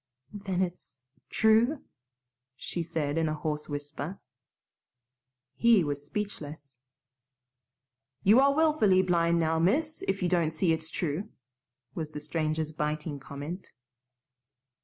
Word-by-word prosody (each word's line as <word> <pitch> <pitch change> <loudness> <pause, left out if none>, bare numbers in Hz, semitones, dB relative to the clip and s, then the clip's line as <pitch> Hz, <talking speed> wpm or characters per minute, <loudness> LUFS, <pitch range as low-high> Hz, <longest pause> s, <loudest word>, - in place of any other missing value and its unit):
"Then 195 -3 -1
it's 175 -7 -7 0.3
true?" 225 +7 +3 0.7
she 170 +6 -4
said 160 -2 -1
in 160 -1 +1
a 155 - -1
hoarse 150 0 -3
whisper. 145 +4 -5 1.3
He 230 - +5
was 145 -1 -3
speechless. 150 -7 -6 1.4
"You 215 +6 +7
are 275 +1 +5
willfully 285 -13 +4
blind 170 -2 +2
now, 160 0 +1
miss, 300 - +1
if 195 -1 0
you - - +3
don't 170 -3 +1
see 165 +1 +2
it's 160 0 -3
true," 170 +6 -2 0.6
was 160 -2 -4
the 150 - -6
stranger's 155 0 -2
biting 150 -1 -3
comment. 145 +7 -7
165 Hz, 115 wpm, -29 LUFS, 150-195 Hz, 1.4 s, You